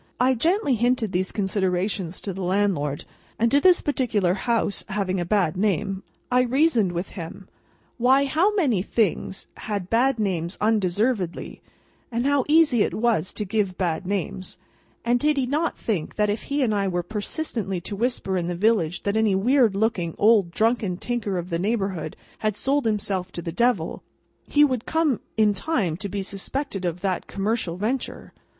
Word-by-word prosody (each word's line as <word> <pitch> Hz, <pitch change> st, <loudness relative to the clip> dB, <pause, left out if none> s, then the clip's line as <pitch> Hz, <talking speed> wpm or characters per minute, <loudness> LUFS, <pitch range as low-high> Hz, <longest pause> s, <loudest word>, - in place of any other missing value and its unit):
I 255 Hz, +1 st, +4 dB
gently 330 Hz, -, +1 dB
hinted 240 Hz, -2 st, +1 dB
these 185 Hz, +1 st, -1 dB
considerations 190 Hz, -2 st, -1 dB
to 195 Hz, -, -4 dB
the 190 Hz, -, -6 dB
landlord. 180 Hz, -7 st, 0 dB, 0.3 s
And 230 Hz, +2 st, +1 dB
as -, -, +6 dB
to -, -, -7 dB
this 365 Hz, +1 st, +5 dB
particular 230 Hz, -11 st, +1 dB
house 220 Hz, 0 st, 0 dB
having 190 Hz, -2 st, -1 dB
a 175 Hz, -, -1 dB
bad 180 Hz, -4 st, +1 dB
name, 195 Hz, 0 st, 0 dB, 0.3 s
I 250 Hz, 0 st, +5 dB
reasoned 250 Hz, -, +2 dB
with 175 Hz, +2 st, -3 dB
him, 180 Hz, +2 st, -8 dB, 0.5 s
Why, 265 Hz, +3 st, +4 dB
how 325 Hz, +9 st, +2 dB
many 265 Hz, -, +2 dB
things 200 Hz, -2 st, -1 dB
had 200 Hz, -4 st, -4 dB
bad 250 Hz, +3 st, +3 dB
names 185 Hz, -4 st, -2 dB
undeservedly, 210 Hz, -2 st, 0 dB, 0.5 s
and 235 Hz, +2 st, -1 dB
how 280 Hz, -2 st, +2 dB
easy 295 Hz, -6 st, +4 dB
it -, -, +1 dB
was 220 Hz, -6 st, +1 dB
to 210 Hz, -, -3 dB
give 200 Hz, -2 st, -1 dB
bad 180 Hz, -1 st, -1 dB
names, 190 Hz, -1 st, -3 dB, 0.5 s
and 240 Hz, +1 st, +3 dB
did 300 Hz, +2 st, +2 dB
he 265 Hz, -, +2 dB
not 300 Hz, +6 st, -1 dB
think 190 Hz, -9 st, -3 dB
that 210 Hz, -1 st, +2 dB
if 210 Hz, -, -4 dB
he 280 Hz, 0 st, 0 dB
and 225 Hz, -4 st, +1 dB
I 200 Hz, -1 st, +1 dB
were 175 Hz, -1 st, -1 dB
persistently 210 Hz, -, -3 dB
to 200 Hz, -, -5 dB
whisper 220 Hz, -4 st, -1 dB
in 170 Hz, -1 st, -1 dB
the 175 Hz, -, -2 dB
village 180 Hz, -4 st, +1 dB
that 200 Hz, +1 st, 0 dB
any 220 Hz, -3 st, +3 dB
weird 235 Hz, +1 st, +3 dB
looking, 195 Hz, -6 st, 0 dB
old 210 Hz, -4 st, +4 dB
drunken 215 Hz, -1 st, 0 dB
tinker 215 Hz, -4 st, -2 dB
of 175 Hz, +1 st, -5 dB
the 165 Hz, -, 0 dB
neighbourhood 195 Hz, -6 st, -2 dB, 0.2 s
had 215 Hz, -2 st, 0 dB
sold 275 Hz, +4 st, +1 dB
himself 195 Hz, -4 st, -1 dB
to 170 Hz, -, -5 dB
the 165 Hz, -, -4 dB
Devil, 205 Hz, -3 st, 0 dB, 0.5 s
he 295 Hz, 0 st, +5 dB
would 255 Hz, -5 st, -2 dB
come 320 Hz, -6 st, +1 dB, 0.2 s
in 215 Hz, -1 st, +4 dB
time 200 Hz, -, -1 dB
to 200 Hz, +2 st, -5 dB
be 200 Hz, +1 st, -3 dB
suspected 200 Hz, +2 st, -4 dB
of 175 Hz, 0 st, -2 dB
that 190 Hz, -3 st, -2 dB
commercial 200 Hz, -3 st, -1 dB
venture! 235 Hz, +7 st, -3 dB
210 Hz, 175 wpm, -24 LUFS, 185-245 Hz, 0.5 s, as